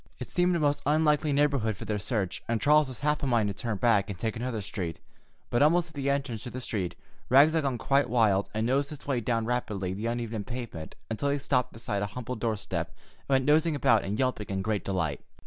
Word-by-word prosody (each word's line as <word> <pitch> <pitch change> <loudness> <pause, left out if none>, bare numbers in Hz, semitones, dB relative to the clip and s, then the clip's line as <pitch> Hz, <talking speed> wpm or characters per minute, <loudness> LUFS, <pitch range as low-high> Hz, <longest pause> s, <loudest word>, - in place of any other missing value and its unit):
It - - -7
seemed 180 -1 +2
a - - +1
most 145 -1 +1
unlikely 150 0 +3
neighborhood 140 -7 +1
for - - -7
their 105 -1 -1
search, 100 -3 -2
and 115 -1 0
Charles 150 +2 +4
was 130 -1 -9
half 150 +1 +1
of - - -3
a - - 0
mind 115 -5 +2
to - - -2
turn 110 +1 -3
back 105 -3 +3
and 100 - -5
take 110 +4 -2
another 120 -1 -3
street, 90 -5 -4 0.5
but 120 - +2
almost 170 +3 +4
at - - -19
the 140 -2 -2
entrance 140 -6 -1
to 125 - -6
the 125 - -6
street 100 -7 -3 0.3
Rags 140 +5 +7
had 165 - +2
gone 135 -4 -1
quite 135 +2 +2
wild 110 -5 +3
and 110 +1 -1
nosed 135 +3 +1
his 150 - -10
way 135 -3 0
rapidly 115 -5 -1
down 95 - -5
the 110 +3 -2
uneven 115 -2 -3
pavement 120 -9 -7 0.2
until 140 +6 -1
he 140 - +1
stopped 125 -3 0
beside 110 -3 -3
a 100 - -1
humble 125 +1 -4
doorstep 110 -2 -2 0.3
and - - -33
went 130 -1 +3
nosing 155 +2 +3
about 115 -5 +3
and 100 +2 -3
yelping 130 -5 -1
in 95 -1 -2
great 105 -1 -1
delight. 90 -7 -2
120 Hz, 235 wpm, -28 LUFS, 105-140 Hz, 0.5 s, Rags